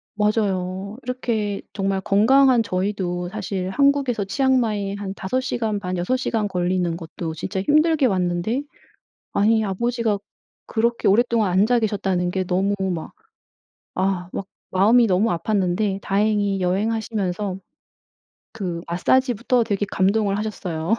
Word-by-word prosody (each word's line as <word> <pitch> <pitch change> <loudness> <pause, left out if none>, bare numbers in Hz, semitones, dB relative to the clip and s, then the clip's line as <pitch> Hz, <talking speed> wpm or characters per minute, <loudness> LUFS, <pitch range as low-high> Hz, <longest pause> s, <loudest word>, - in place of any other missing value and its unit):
맞아요. 200 -1 -1
이렇게 225 -5 -2
정말 195 -1 -1
건강한 240 +5 +4
저희도 185 -2 -2
사실 190 -2 -3
한국에서 275 -3 +2
치앙마이 220 -5 +1
한 200 -1 -5
5 225 +7 -1
시간 225 -5 -2
반 185 -2 -3
6 215 +9 0
시간 225 -4 -1
걸리는 180 -2 -1
것도 165 -1 -6
진짜 190 +4 -3
힘들게 305 +3 +3
왔는데 185 +7 0 0.7
아니 220 +2 +3
아버지가 230 +1 0 0.5
그렇게 235 +1 0
오랫동안 225 -2 +3
앉아 215 +6 +3
계셨다는 195 -4 0
게 190 0 -1
너무 190 +3 +1 0.2
막 160 - -6 0.8
아 185 -1 -1
막 195 - -4 0.2
마음이 225 +6 +5
너무 195 +3 +2
아팠는데 195 +2 0
다행히 205 -1 +1
여행하시면서 200 0 -1 0.9
그 180 -6 -4
마사지부터 245 +6 +2
되게 205 -2 -1
감동을 200 +1 +1
하셨어요. 185 -3 -2
205 Hz, 290 characters per minute, -22 LUFS, 185-225 Hz, 0.9 s, 마음이